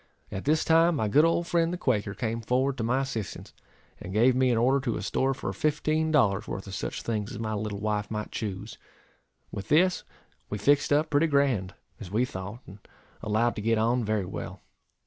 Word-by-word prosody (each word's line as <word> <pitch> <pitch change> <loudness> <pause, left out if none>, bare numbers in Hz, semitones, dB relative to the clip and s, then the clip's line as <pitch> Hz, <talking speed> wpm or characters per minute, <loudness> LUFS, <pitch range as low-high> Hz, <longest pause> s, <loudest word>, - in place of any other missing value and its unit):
At 95 - -5
this 155 +2 +2
time, 165 +1 +4
my 110 -7 0
good 145 +9 +5
old 165 +1 +1
friend 170 -1 +1
the 180 - -3
Quaker 105 - 0
came 115 -1 -2
forward 130 +4 +1
to - - -1
my 125 +4 +1
assistance, 115 -7 -5 0.5
and 90 - -8
gave 120 +5 +4
me 130 0 +3
an 120 - +2
order 130 +4 +3
to 125 -4 -2
a - - -5
store 135 0 0
for - - -4
fifteen 155 +1 0
dollars' 105 -9 +2
worth 95 - -5
of 95 - -8
such 95 - -4
things 105 -2 -2
as - - -6
my 110 0 -3
little 105 -1 -3
wife 105 -1 -1
might 105 -1 -4
choose. 105 +1 -5 0.7
With 100 0 -6
this, 175 +4 +3 0.5
we 105 - -3
fixed 140 +8 +2
up 150 +2 +2
pretty 145 +3 +3
grand, 135 -10 +1 0.2
as 105 -6 -8
we 110 +6 +1
thought, 100 +2 -7
and 100 +3 -12 0.4
allowed 110 +3 +1
to - - -3
get 115 +1 +2
on 120 +3 +2
very 105 -2 0
well. - - -7
115 Hz, 205 wpm, -27 LUFS, 105-140 Hz, 0.7 s, good